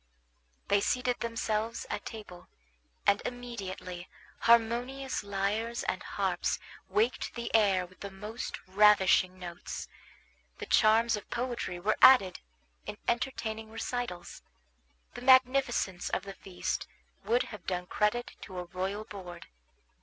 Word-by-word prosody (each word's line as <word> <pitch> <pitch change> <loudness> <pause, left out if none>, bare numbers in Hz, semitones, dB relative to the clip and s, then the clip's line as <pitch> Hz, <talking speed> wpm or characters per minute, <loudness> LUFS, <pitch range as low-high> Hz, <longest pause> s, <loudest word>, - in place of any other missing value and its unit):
They 200 0 +3
seated 250 +3 0
themselves 225 -1 -2
at - - -4
table, 205 -6 -10 0.6
and 200 0 +4
immediately 195 -7 -6 0.3
harmonious 240 +4 +2
lyres 205 +4 -1
and - - -2
harps - - -1 0.3
waked 430 +3 0
the 235 -1 -5
air 200 -5 +4
with 185 +1 -19
the 200 - -6
most 210 +4 -6
ravishing 190 -2 +5
notes. 175 -1 -7 0.7
The - - -6
charms 225 +1 +4
of 210 - -8
poetry 240 -7 -3
were 210 +4 +1
added 250 -9 +7 0.5
in 210 - -5
entertaining 225 -3 -2
recitals; 225 -5 -5 0.7
the - - -8
magnificence 255 -7 +3
of 185 - -1
the 200 0 -7
feast 190 -2 -4 0.4
would 235 +5 +2
have 210 - -10
done 180 -1 -1
credit 210 +6 0
to 190 -3 -8
a 180 - -2
royal 190 +4 -3
board. 180 -5 -9
215 Hz, 125 wpm, -30 LUFS, 190-235 Hz, 0.7 s, added